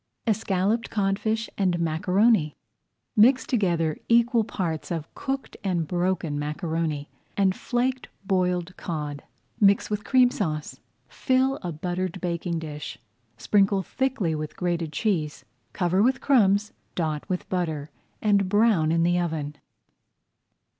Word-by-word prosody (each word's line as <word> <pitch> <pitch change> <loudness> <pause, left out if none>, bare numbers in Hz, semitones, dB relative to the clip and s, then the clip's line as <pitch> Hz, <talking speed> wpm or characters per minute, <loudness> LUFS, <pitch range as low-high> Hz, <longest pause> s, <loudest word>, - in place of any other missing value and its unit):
ESCALLOPED 215 0 0
CODFISH 215 +2 0
AND 185 -3 +2
MACARONI 180 +1 +2 0.6
Mix 250 +5 +5
together 170 - 0
equal 235 0 +4
parts 170 -7 -3
of 165 -3 -4
cooked 270 0 -4
and 175 -5 0
broken 175 -4 -1
macaroni 155 -1 -2 0.3
and 190 -2 +3
flaked 255 +1 -1 0.2
boiled 180 -1 0
cod. 150 -4 -4 0.4
Mix 200 0 +4
with 210 0 -1
Cream 250 +1 +4
Sauce. 155 - -3 0.3
Fill 260 - +1
a 175 - -4
buttered 180 +3 -3
baking 170 -1 -2
dish, 150 -2 -6
[Page - - -27 0.3
100] 120 - -21
sprinkle 200 -1 +3
thickly 260 -8 -1
with 155 -1 -5
grated 170 -3 -1
cheese, 160 -7 -1 0.3
cover 180 +2 +1
with 260 +4 +3
crumbs, 210 -5 +3 0.2
dot 155 -3 -1
with 180 -1 -2
butter, 160 -5 -2 0.3
and 200 -3 +3
brown 205 -7 +3
in 165 0 +2
the 175 +1 +2
oven. 155 -4 -3
185 Hz, 125 wpm, -25 LUFS, 160-215 Hz, 0.6 s, Mix